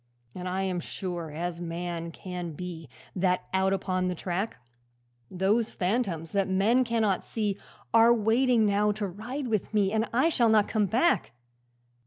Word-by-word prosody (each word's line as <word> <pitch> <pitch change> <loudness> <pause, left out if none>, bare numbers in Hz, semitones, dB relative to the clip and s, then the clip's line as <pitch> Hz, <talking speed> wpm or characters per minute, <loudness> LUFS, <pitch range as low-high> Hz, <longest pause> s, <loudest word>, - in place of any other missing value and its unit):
'And 180 0 -5
I 190 +1 -1
am 185 -2 -1
sure 175 -2 -5
as 170 +3 -4
man 170 0 -4
can 180 -1 -6
be 165 -2 -7 0.3
That 180 -1 +1
out 190 0 +2
upon 185 -1 0
the 180 - -1
track, 185 +5 -3 0.7
Those 205 +5 +1
phantoms 180 -5 -1
that 195 -1 +1
men 210 +7 +3
cannot 225 -5 +1
see 210 -3 -2 0.3
Are 230 +1 +7
waiting 235 +1 +3
now 205 +1 +2
to 205 0 -3
ride 240 +9 -5
with 215 -1 -2
me, 200 -2 +3
And 220 +1 0
I 260 +7 +3
shall 240 -8 +3
not 215 -2 +4
come 215 -2 +1
back. 240 - +2
195 Hz, 160 wpm, -28 LUFS, 180-225 Hz, 0.7 s, Are